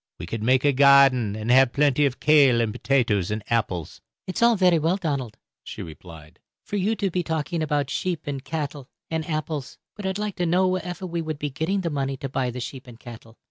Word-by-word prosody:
We - - -7
could 110 +5 -5
make 130 +4 +2
a 145 - +4
garden 135 -5 +5
and 110 +2 -2
haf 130 -1 +5
plenty 145 0 +3
of 130 - -5
kail, 140 -6 +5
and 115 -2 0
potatoes, 120 -7 +1
and 105 0 -3
apples." 95 -8 -2 0.2
"It's 185 - -4
all 235 -1 +5
ferry 180 -3 +4
well, 165 +5 +1
Donald," 140 - -3 0.3
she - - -7
replied, 80 -1 -12 0.2
"for - - -6
you 205 +4 +1
to 200 -3 -1
be 180 - 0
talking 160 +1 -2
about 145 -3 -1
sheep, 180 +1 -2
and 140 -2 -4
cattle, 145 -3 -5 0.2
and 160 -1 -3
apples; 155 -3 -4 0.2
but 205 -2 -5
I'd 190 0 -2
like 210 -1 -4
to 175 - 0
know 180 +3 +3
wherefer 185 0 -3
we 170 -1 -3
would 155 -2 -4
be 145 0 -4
getting 165 +8 -1
the 170 -3 -2
money 135 -2 -2
to 135 0 -5
buy 130 -1 -1
the 125 +1 -6
sheep 130 +1 -7
and 120 -2 -13
cattle? 115 -2 -12
140 Hz, 220 wpm, -24 LUFS, 125-170 Hz, 0.3 s, garden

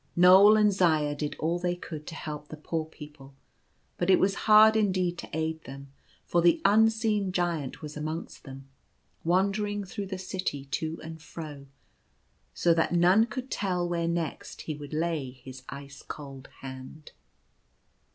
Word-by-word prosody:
Knoal 190 +4 +8
and 210 -1 +4
Zaya 155 -6 +2
did 145 0 -4
all 170 +3 -1
they 175 0 -1
could 155 -4 -8
to 165 - -7
help 150 -2 -6
the 155 - -9
poor 160 +1 -3
people, 150 -3 -13 0.6
but 175 - 0
it 185 - +7
was 195 +1 +3 0.2
hard 215 +1 +8
indeed 185 -5 +1
to - - -8
aid 160 0 -3
them, 135 +1 -10 0.3
for 175 - +2
the 170 0 +4
un 220 +3 +6
seen 215 -3 0
Giant 170 -7 -2
was 150 0 -7
amongst 155 +2 -5
them, 135 -1 -10 0.6
wandering 200 +4 +1
through 195 +1 -6
the 190 0 -5
city 185 -7 -4
to 155 +3 -3
and 160 0 -9
fro, 150 -4 -9 0.8
so 170 - +2
that 165 +1 +1
none 185 +6 +5
could 255 +3 -6
tell 180 -3 -1
where 170 -1 -1
next 170 -3 -3
he 155 - -4
would 145 -1 -9
lay 160 -3 -1
his 130 0 -12
ice 140 0 -9
cold 135 -3 -9
hand. 130 +3 -9
165 Hz, 160 wpm, -28 LUFS, 150-190 Hz, 0.8 s, Knoal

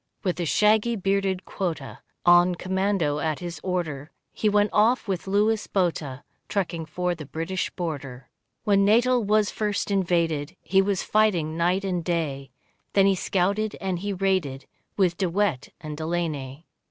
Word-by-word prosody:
With 180 -3 -1
a 175 - 0
shaggy 215 +6 +3
bearded 195 -1 0
quota 155 - -4 0.3
On 175 +1 +6
commando 190 -5 0
at 155 -1 -1
his 175 -3 -6
order, 160 -6 -3 0.2
He 215 - +1
went 205 0 +2
off 225 +3 +3
with 190 -2 -3
Louis 210 +2 +1
Botha 160 -8 -1 0.3
Trekking 170 -5 -2
for 180 +2 -1
the 155 -4 -9
British 165 +5 -3
border. 135 -7 -6 0.4
When 200 -2 +3
Natal 240 +4 +4
was 210 0 +2
first 210 -1 -2
invaded 170 -4 0
He 190 0 +3
was 195 -1 0
fighting 180 -8 +2
night 180 +4 +1
and 180 -3 -1
day, 150 -6 -2 0.4
Then 195 -1 +5
he 195 - +5
scouted 200 +3 0
and 185 -2 -2
he 200 +2 -3
raided, 185 -9 -1 0.3
With 180 -4 +2
De 185 -3 +1
Wet 170 -7 0
and 155 -1 -6
Delaney. 155 -3 -3
180 Hz, 155 wpm, -25 LUFS, 160-200 Hz, 0.4 s, On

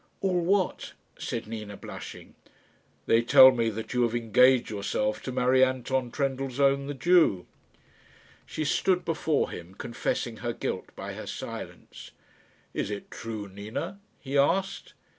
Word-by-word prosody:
"All 180 -3 +1
what?" 190 +1 0 0.3
said - - -4
Nina, 105 -2 -7
blushing. - - -9 0.7
"They 115 - +4
tell 130 +2 +8
me 115 -3 0
that 110 +2 -6
you 125 - +1
have 120 -1 +1
engaged 120 +2 +4
yourself 105 +1 -1
to 130 - -5
marry 130 +1 +3
Anton 130 0 0
Trendellsohn, 135 +1 0
the 145 - -4
Jew." 150 - +3 1.0
She 155 - -3
stood 180 +5 +1
before 160 -2 0
him 85 +3 -9
confessing 120 0 -3
her 120 -1 -3
guilt - - -4
by - - -6
her - - -8
silence. - - -8 0.6
"Is - - -2
it 100 -1 -6
true, 110 -3 -6
Nina?" 110 - -6 0.2
he 135 0 -6
asked. 190 +7 0
125 Hz, 140 wpm, -27 LUFS, 110-140 Hz, 1.0 s, tell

